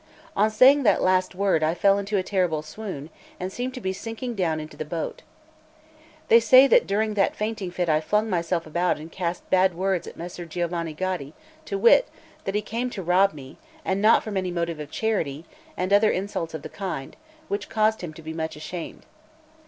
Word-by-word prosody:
On 215 +2 +3
saying 260 +6 +6
that 225 - +3
last 185 0 +2
word, 190 -4 +2
I 155 +2 +1
fell 200 +2 +3
into 200 +1 -1
a 185 - +1
terrible 180 -6 0
swoon, 160 -4 -7 0.3
and 185 +1 -4
seemed 255 +2 -4
to - - -5
be 190 -5 -2
sinking 225 +4 -5
down 170 -7 0
into 155 0 -8
the - - -4
boat. 160 +1 -5 1.1
They 230 - +7
say 255 +4 +7
that 475 - +4
during 215 +2 0
that 200 -2 +1
fainting 210 -3 -3
fit 175 0 -2
I 155 -1 +3
flung 210 +7 +1
myself 170 -3 -1
about 175 +3 0
and 155 +2 -10
cast 175 -1 -4
bad 185 -1 +4
words 190 0 -1
at - - -10
Messer 175 0 -7
Giovanni 170 -1 -3
Gaddi, 180 -5 -3 0.3
to 200 - -3
wit, 235 - +5 0.4
that 195 - -2
he 210 - 0
came 235 +4 -3
to 195 -6 -6
rob 185 +3 +3
me, 135 -2 -12 0.3
and 190 +1 0
not 220 +2 +5
from 210 -3 -4
any 185 -1 -1
motive 170 -2 -2
of 150 -1 -7
charity, 165 -9 -2 0.3
and 185 +2 0
other 210 +1 +5
insults 180 -4 -3
of 150 - -7
the - - -7
kind, 180 -9 -5 0.3
which 205 0 -3
caused 220 0 +1
him 175 -3 -5
to 165 - -12
be 160 +1 -6
much 160 -1 -4
ashamed. 160 +3 -7
185 Hz, 205 wpm, -25 LUFS, 165-210 Hz, 1.1 s, They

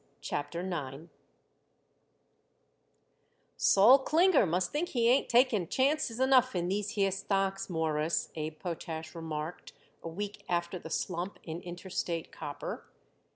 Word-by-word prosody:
CHAPTER 145 +4 -3
IX 160 -4 -5 2.5
"Sol 230 +8 +6
Klinger 315 - +4
must 175 +2 0
think 320 +4 -1
he 235 -3 +1
ain't 255 +3 +3
taking 235 -7 +3
chances 265 - +1
enough 260 -3 +4
in 175 0 0
these 205 +1 -1
here 195 -1 +3
stocks, 195 0 -1
Mawruss," 160 -1 0
Abe 155 0 -5
Potash 160 -2 -5
remarked 160 0 -6 0.3
a 165 - -6
week 205 +5 -6
after 175 +1 -1
the 160 - -9
slump 180 +3 -3
in 165 +1 -6
Interstate 175 -2 -4
Copper. 145 -1 -6
180 Hz, 120 wpm, -31 LUFS, 165-225 Hz, 2.5 s, Sol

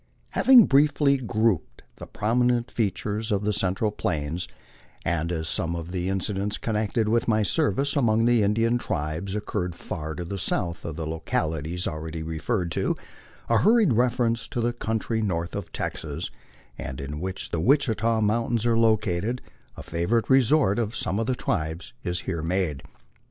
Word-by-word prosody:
Having 255 -5 +7
briefly 140 0 +4
grouped 110 - 0
the - - -9
prominent 120 +2 +1
features 105 0 -1
of 100 -1 +1
the 105 +1 +1
central 100 +2 0
Plains, 80 -3 -2 0.6
and 85 0 0
as 80 -2 -2
some 85 0 -1
of 85 0 -6
the 90 0 -2
incidents 100 +2 -1
connected 110 0 0
with 115 +2 +1
my 110 -2 +3
service 105 - +1
among 115 -5 +3
the 120 -1 +4
Indian 115 +4 +2
tribes 90 -1 -3
oc 105 - -3
curred 90 -4 -2
far 80 -2 -5
to 90 - -5
the 100 +3 -4
south 85 -1 -1
of 80 - -4
the 80 0 -4
localities 80 +1 -2
already 80 +1 -4
referred 85 +4 -2
to, - - 0 0.5
a 115 -1 +3
hurried 220 - +4
reference 115 -1 +1
to 135 - -4
the 120 +1 +1
country 110 -1 -2
north 85 -4 -2
of 100 -3 -5
Texas, - - -4 0.5
and 65 - -5
in 70 +2 -5
which 95 +2 -4
the 85 - -1
Wichita 115 - +2
mountains 115 +2 +1
are 115 -1 +3
located, 110 0 +1 0.4
a - - -7
favorite 105 +10 0
resort 130 -4 +4
of 115 0 -2
some 100 - -1
of 115 - -1
the 130 - +1
tribes, 80 -4 -3
is 90 0 -2
here 85 -4 -3
made. 80 -4 -1
105 Hz, 165 wpm, -25 LUFS, 85-115 Hz, 0.6 s, Having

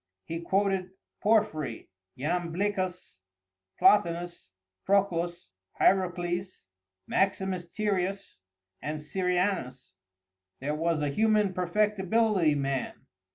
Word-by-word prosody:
He 165 0 -4
quoted 190 +1 0 0.3
Porphyry, 205 - +1 0.3
Iamblicus, 180 - -2 0.6
Plotinus, 175 - +2 0.3
Proclus, 175 - 0 0.3
Hierocles, 180 -1 +1 0.4
Maximus 190 -2 0
Tyrius, 195 - -2 0.4
and 150 +1 -3
Syrianus. 175 - -1 0.7
There 145 +3 -2
was 160 0 0
a 145 - +1
human 210 +4 +2
perfectibility 195 -1 +2
man. 135 -2 -3
180 Hz, 75 wpm, -28 LUFS, 165-200 Hz, 0.7 s, Plotinus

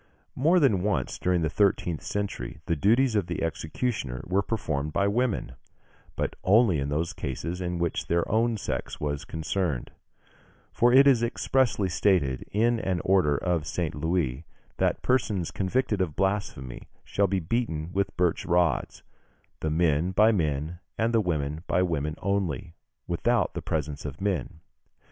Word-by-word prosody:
] - - -41
More 165 +7 +4
than 110 - +3
once 105 +1 -1
during 90 -2 +1
the - - +2
thirteenth 90 -4 +1
century 85 -9 -4
the 85 - 0
duties 115 - +3
of 100 -5 +1
the - - -3
executioner 80 - -3
were 95 +3 +1
performed 80 -9 -2
by 100 - +2
women, 115 +2 0 0.6
but - - -2
only 100 -4 +4
in 70 +1 -2
those 80 +3 -1
cases 85 +7 -4
in 90 -1 -2
which 85 -1 -2
their 85 0 +1
own 115 +1 +1
sex - - -4
was 75 -1 -3
concerned; 80 -4 -2 0.8
for 120 +1 +4
it 135 +2 +7
is 135 -5 +5
expressly 120 -3 +1
stated 85 -8 +1
in 115 +3 +2
an 95 -4 -1
order 90 -7 +3
of 85 -3 -1
St. 85 -1 -2
Louis, 75 -3 -1 0.3
that - - 0
persons 105 -9 +1
convicted 105 +1 0
of 80 -5 -1
blasphemy 95 -10 -2
shall 100 0 +1
be 95 0 0
beaten 85 -4 -2
with 95 -1 -1
birch 90 -1 +1
rods, 85 -1 +1 0.6
"the 80 - -1
men 80 +2 +1
by 110 +4 +5
men, 80 -3 -1 0.2
and 115 +1 +1
the 115 - +4
women 80 -4 -2
by 90 - +2
women 75 -4 -1
only, 90 -6 -1 0.3
without - - +1
the - - -4
presence 75 -1 -3
of 70 -1 -6
men." 90 -6 -2
90 Hz, 160 wpm, -27 LUFS, 80-105 Hz, 0.8 s, it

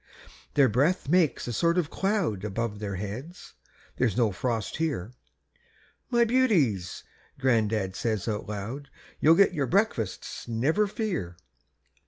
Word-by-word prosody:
Their 140 -2 +6
breathin' 140 - +1
makes 170 -6 +3
a 120 - -3
sort 170 +9 +2
of 165 -4 0
cloud 190 - 0
Above 105 +1 -3
their 100 -2 -4
heads 110 - -7 0.4
there's 120 -4 +1
no 115 -4 +3
frost 110 +3 -2
here. 130 - -2 1.0
"My 235 -1 +4
beauties," 180 - +1 0.3
gran'dad 110 -7 +1
says 110 -2 -2
out 105 -2 -3
loud, 115 +8 -5 0.3
"You'll 160 +2 +6
get 195 0 +5
your 145 -5 -1
breakfasts, 170 - -1
never 145 - +1
fear." 185 - -3
125 Hz, 130 wpm, -27 LUFS, 105-170 Hz, 1.0 s, Their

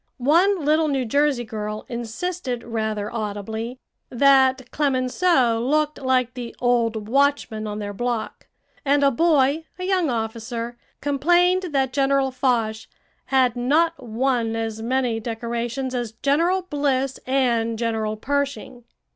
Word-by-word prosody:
One 335 +6 +3
little 310 +1 +3
New 270 -3 0
Jersey 280 +1 +1
girl 215 -1 -5
insisted 245 +2 -4
rather 220 -2 -3
audibly 220 +2 -4 0.3
that 260 -1 +3
Clemenceau 260 -2 +2
looked 300 +4 0
like 255 -2 +1
the 245 -2 -7
old 230 -3 +1
watchman 265 -4 +1
on 210 0 -4
their 205 -1 -5
block; 240 +1 -3 0.4
and 285 0 +2
a 280 - +5
boy, 300 +1 +2
a 365 - -6
young 370 -4 +1
officer, 230 +1 -3 0.3
complained 350 +6 +2
that 265 -3 0
General 275 -1 +2
Foch 230 -4 0 0.4
"had 255 -3 +2
not 300 +6 +1
won 235 -1 0
as 225 -1 -3
many 245 -1 0
decorations 235 +3 -3
as 240 -3 -3
General 335 +10 +1
Bliss 275 -5 -1
and 235 -4 +1
General 220 -2 -1
Pershing." 275 -1 -3
255 Hz, 125 wpm, -23 LUFS, 230-280 Hz, 0.4 s, a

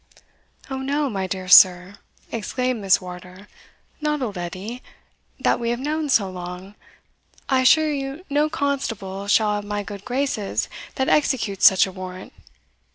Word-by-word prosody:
"O 265 - -4
no, 280 +1 -1
my 190 -2 -2
dear 185 0 -5
sir," 180 +2 +6 0.3
exclaimed 250 +1 -2
Miss 195 -2 +4
Wardour, 180 +2 -11 0.5
"not 300 -2 -1
old 210 -5 -4
Edie, 190 +7 -6 0.6
that - - +1
we 235 -1 -2
have 240 0 -1
known 300 +2 -2
so 220 -7 +3
long; 180 +1 -8 0.7
I 265 -1 +2
assure 310 +4 +4
you 275 +5 -5
no 295 +1 +1
constable 225 -10 -3
shall 210 0 +3
have 205 0 -3
my 205 0 -3
good 200 0 -9
graces 250 -5 -2 0.3
that 265 -1 0
executes 225 -9 +3
such 190 - +5
a 190 - -7
warrant." 185 0 -9
210 Hz, 150 wpm, -22 LUFS, 190-270 Hz, 0.7 s, sir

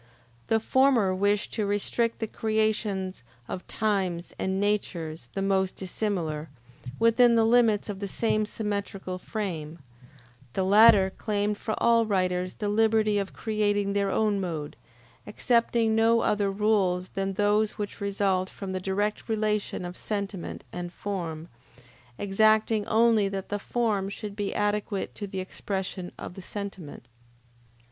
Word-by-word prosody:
The 225 - +3
former 240 -5 +3
wished 205 +2 +1
to 215 -3 -1
restrict 220 +3 0
the 225 - -2
creations 215 - -1 0.3
of 185 - -6
times 190 -5 -1
and 190 0 -1
natures 170 -9 -2
the 195 - -1
most 190 -1 +1
dissimilar, 175 -6 -3 0.5
within 230 +1 +5
the 225 -1 +4
limits 225 -3 +3
of 205 -2 -5
the 200 - -3
same 215 +1 0
symmetrical 200 -4 -4
frame; 170 -8 -4 0.8
the 190 - 0
latter 200 0 +6
claimed 210 -1 -1
for 220 - -2
all 230 -1 +3
writers 185 -2 0
the 210 - -3
liberty 215 0 +3
of 195 -1 -4
creating 205 -2 0
their 200 -1 +1
own 210 0 +1
mode, 160 -5 -4 0.5
accepting 230 -1 +2
no 225 +1 +4
other 205 -1 +1
rules 195 -3 +1
than 195 0 -2
those 210 +2 +2
which 205 -1 -6
result 195 -2 0
from 195 -2 -7
the 185 - -2
direct 205 +4 -2
relation 210 -4 -1
of 175 0 -6
sentiment 200 -4 -4
and 175 0 -5
form, 170 -5 -5 0.7
exacting 215 +1 +2
only 225 -2 +4
that 195 -1 -5
the 205 - -2
form 210 -3 -1
should 200 0 -6
be 205 -1 -3
adequate 205 -1 -1
to 205 - -5
the 190 -1 -5
expression 190 -1 -4
of - - -7
the 190 - -9
sentiment. 190 - -7
205 Hz, 140 wpm, -27 LUFS, 190-215 Hz, 0.8 s, latter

